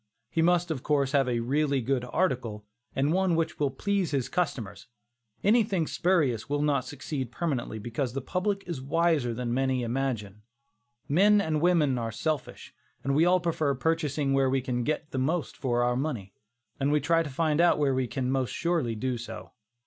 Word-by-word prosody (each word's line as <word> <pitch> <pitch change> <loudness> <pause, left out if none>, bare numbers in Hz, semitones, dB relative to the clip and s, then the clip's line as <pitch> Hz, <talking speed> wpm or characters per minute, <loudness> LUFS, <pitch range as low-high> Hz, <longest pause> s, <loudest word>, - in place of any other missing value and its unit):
He 165 - +1
must, 175 0 +2
of 140 -5 -3
course, 140 -2 +1
have 135 -3 +2
a 120 -1 0
really 140 +3 +1
good 130 +1 0
article, 120 - -1 0.3
and 140 +4 +2
one 185 -2 +2
which 165 0 -1
will 145 -2 +2
please 195 +6 -1
his 135 -4 -1
customers; 140 - -3 0.6
anything 205 -6 +3
spurious 150 - +1
will 145 0 0
not 140 -3 +1
succeed 140 -3 -5
permanently, 130 -7 -2
because 120 +3 -3
the 135 - -2
public 195 - -1
is 170 -7 -5
wiser 155 -3 +1
than 120 0 -3
many 130 -1 +1
imagine. 115 -5 -2 0.7
Men 205 +8 +5
and 155 -5 0
women 160 -7 +3
are 115 -1 -3
selfish, 155 +5 -4 0.3
and 135 - 0
we 155 +4 +4
all 180 +1 +4
prefer 160 -5 0
purchasing 150 -2 0
where 135 -1 +3
we 135 +1 +2
can 125 -1 -2
get 155 +3 -2
the 130 - -2
most 155 +5 -1
for 120 -2 0
our 120 0 +1
money; 125 -9 -3 0.5
and 140 +1 +1
we 150 - +3
try 165 +2 +2
to 160 - -4
find 155 +3 +1
out 175 - +4
where 145 -2 +2
we 130 -1 0
can 130 0 -2
most 130 -2 0
surely 165 -10 0
do 125 +2 -2
so. 120 - -8
140 Hz, 185 wpm, -28 LUFS, 125-165 Hz, 0.7 s, Men